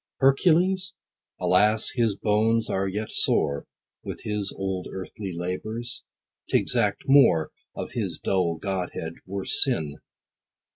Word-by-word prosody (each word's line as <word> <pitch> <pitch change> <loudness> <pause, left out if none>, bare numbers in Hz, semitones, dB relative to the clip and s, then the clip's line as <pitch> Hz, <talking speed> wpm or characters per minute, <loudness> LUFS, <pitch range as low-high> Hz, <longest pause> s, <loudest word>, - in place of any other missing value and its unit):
Hercules? 180 +7 +3 0.4
Alas 110 +1 +3
his 115 -5 +1
bones 110 +2 +1
are 95 0 0
yet 105 +3 -3
sore, 70 -1 +2 0.4
With - - -6
his 105 -2 -1
old 95 -1 -3
earthly 95 +1 -6
labors: 110 +8 -3 0.5
t' - - +4
exact - - +1
more, 135 - +5 0.2
Of - - -5
his - - -3
dull 90 -3 0
godhead, 90 -3 -3
were 95 0 -4
sin. 80 - +1
105 Hz, 115 wpm, -26 LUFS, 95-120 Hz, 0.5 s, more